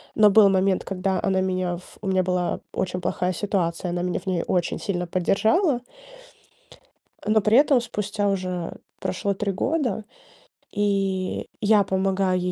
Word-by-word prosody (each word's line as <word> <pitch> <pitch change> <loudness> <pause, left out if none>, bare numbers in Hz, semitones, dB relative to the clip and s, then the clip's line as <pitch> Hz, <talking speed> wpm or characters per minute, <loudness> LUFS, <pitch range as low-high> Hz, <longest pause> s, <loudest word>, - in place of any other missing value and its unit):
но 215 -1 +6
был 210 0 +7
момент, 190 0 +2
когда 190 0 -1
она 190 -2 +2
меня 185 -2 -1
в 180 - -15
у 210 - -5
меня 190 -1 +2
была 180 -1 -1
очень 180 -1 -2
плохая 180 +1 -1
ситуация, 180 -2 -1
она 175 0 -2
меня 180 - -1
в 195 - -19
ней 180 -3 0
очень 175 -2 0
сильно 180 -3 -2
поддержала 225 - +2 1.4
э, 210 - -3
но 215 0 +5
при 215 +3 +3
этом 280 -3 +5
спустя 205 -3 -2
уже 185 -3 -2 0.3
прошло 200 +2 -1
3 200 0 -2
года, 245 - -1 0.7
и 195 -2 -1
я 210 -1 +4
помогаю 190 -1 +1
ей 180 0 -1
190 Hz, 160 wpm, -24 LUFS, 180-205 Hz, 1.4 s, был